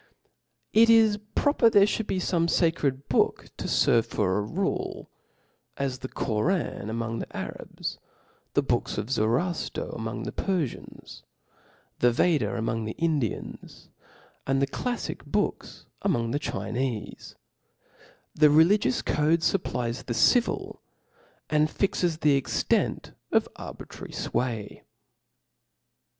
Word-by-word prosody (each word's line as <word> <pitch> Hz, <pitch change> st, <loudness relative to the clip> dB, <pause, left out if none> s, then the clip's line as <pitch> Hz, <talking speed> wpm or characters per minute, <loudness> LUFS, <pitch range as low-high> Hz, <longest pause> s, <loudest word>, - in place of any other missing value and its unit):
It 230 Hz, +1 st, +6 dB
is 220 Hz, -2 st, +5 dB, 0.2 s
proper 285 Hz, -5 st, +4 dB
there 200 Hz, -2 st, +6 dB
ihould 215 Hz, +1 st, -2 dB
be -, -, -1 dB
feme 170 Hz, -2 st, +1 dB
facred 145 Hz, -6 st, +1 dB
book -, -, +1 dB
to -, -, -5 dB
ferve 115 Hz, -, +3 dB
for 100 Hz, -3 st, 0 dB
a -, -, 0 dB
rule, 175 Hz, -, -3 dB, 0.7 s
as 135 Hz, -2 st, -2 dB
the 130 Hz, -, -5 dB
Koran 120 Hz, -, -1 dB
among 115 Hz, 0 st, -3 dB
the -, -, -7 dB
Arabs, -, -, -6 dB, 0.6 s
the -, -, +3 dB
books -, -, -1 dB
of 115 Hz, -, -3 dB
Zoroafter 135 Hz, +10 st, -1 dB
among 110 Hz, +1 st, -4 dB
the -, -, -4 dB
Perfians, 175 Hz, -10 st, -4 dB, 0.8 s
the 120 Hz, -, +5 dB
Vedam 150 Hz, +4 st, +2 dB
among 115 Hz, 0 st, -2 dB
the 110 Hz, -, -4 dB
Indians, 150 Hz, -, -3 dB, 0.6 s
and 135 Hz, 0 st, +2 dB
the 140 Hz, -, +3 dB
clalfic 245 Hz, -, -4 dB
Boob -, -, -1 dB, 0.4 s
among 120 Hz, -12 st, 0 dB
the 145 Hz, -, 0 dB
Chinef<:. 115 Hz, -1 st, -4 dB, 1.0 s
The 150 Hz, -1 st, +5 dB
religious 160 Hz, -1 st, +4 dB
code 155 Hz, +2 st, +2 dB
fupplies 125 Hz, -10 st, -1 dB
the 120 Hz, -, -2 dB
civil, 240 Hz, -, +2 dB, 0.7 s
and 150 Hz, 0 st, +2 dB
fixes 175 Hz, -2 st, 0 dB
the 150 Hz, -2 st, +3 dB
extent 135 Hz, -, 0 dB, 0.2 s
<^ -, -, +3 dB
arbitrary -, -, -9 dB
fway. 115 Hz, -5 st, -3 dB
140 Hz, 120 wpm, -27 LUFS, 115-175 Hz, 1.0 s, It